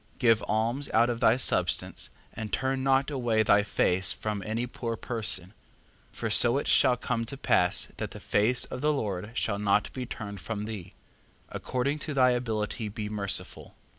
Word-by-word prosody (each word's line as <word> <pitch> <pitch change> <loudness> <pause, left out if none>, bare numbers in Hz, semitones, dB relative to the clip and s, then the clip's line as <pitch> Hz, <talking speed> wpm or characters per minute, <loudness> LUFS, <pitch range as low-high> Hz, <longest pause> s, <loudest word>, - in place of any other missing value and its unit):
4:7. - - -31
Give 115 -4 +3
alms 115 +6 -1
out 120 +2 +4
of 115 - -4
thy 115 -1 +4
substance, 130 - +1 0.2
and 110 -2 -6
turn 130 +4 -1
not 135 +2 +2
away 120 -5 +1
thy 105 -1 +4
face 95 -2 +1
from 105 -2 -3
any 115 +3 -2
poor 120 -1 -4
person: 105 -5 -2 0.6
for - - -4
so 120 +3 +5
it 145 - -2
shall 125 -3 +4
come 115 0 -2
to 135 +4 -7
pass 90 -8 +2
that - - -4
the - - -10
face 115 +4 +2
of 125 - -7
the 150 - +2
Lord 105 -8 -3
shall 100 -4 -1
not 105 0 +1
be 125 -2 -5
turned 100 -5 -7
from 105 +1 -4
thee. 100 -5 -7 0.6
4:8. - - -9
According 140 +4 -2
to 150 -1 -5
thy 130 -1 +5
ability 110 -2 -2
be 105 0 -5
merciful. 100 -3 -3
115 Hz, 185 wpm, -28 LUFS, 105-125 Hz, 0.6 s, so